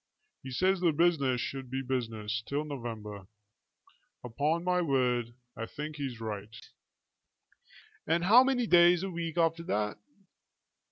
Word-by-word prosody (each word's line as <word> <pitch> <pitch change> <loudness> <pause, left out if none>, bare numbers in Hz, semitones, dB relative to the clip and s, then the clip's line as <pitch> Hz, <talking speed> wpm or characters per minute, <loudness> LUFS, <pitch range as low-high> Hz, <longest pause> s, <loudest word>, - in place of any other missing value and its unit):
He 130 - -8
says 185 +9 +1
the 175 -2 +3
business 145 -6 +2
should 135 +1 -5
be 135 +1 -3
the - - -15
business 110 -2 -3
till 145 +2 -1
November. 110 -8 -7 1.0
Upon 145 +8 -1
my 180 0 +1
word, 125 -6 0 0.2
I 115 - -5
think 150 +3 -7
he's 135 -5 -5
right." 110 0 -6 1.5
"And 170 +2 +2
how 225 +8 +7
many 260 -2 +1
days 175 -2 +5
a 195 - -3
week 170 -1 -4
after 165 0 +2
that?" 105 -9 -2
140 Hz, 135 wpm, -30 LUFS, 115-170 Hz, 1.5 s, how